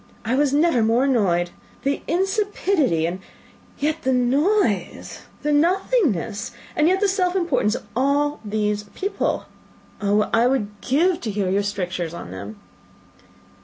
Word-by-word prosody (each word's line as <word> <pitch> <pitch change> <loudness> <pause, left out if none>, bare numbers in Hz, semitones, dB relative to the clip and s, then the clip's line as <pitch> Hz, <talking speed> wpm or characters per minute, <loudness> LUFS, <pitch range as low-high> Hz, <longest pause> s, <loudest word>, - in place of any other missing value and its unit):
I 230 - 0
was 280 +1 +2
never 295 -3 +3
more 225 +3 +3
annoyed! 185 -10 +2 0.3
The 280 +1 0
insipidity, 380 - +1
and 175 +3 -3 0.6
yet 310 +2 -1
the 260 - 0
noise 255 - +1 0.2
the 295 0 +1
nothingness, 305 - +1 0.2
and 305 -2 +3
yet 375 +3 +2
the 410 - +4
self 375 -2 +1
importance, 285 - +1
of - - -7
all 285 +3 +1
these 210 -1 -1
people! 395 +2 -2 0.5
What 205 0 +1 0.2
would 265 -1 +2
I 205 0 -16
give 335 +6 +2
to 225 - -3
hear 200 -3 -1
your 200 +1 +2
strictures 180 -4 -3
on 90 - -8
them!" 100 +3 -8
260 Hz, 140 wpm, -22 LUFS, 205-335 Hz, 0.6 s, the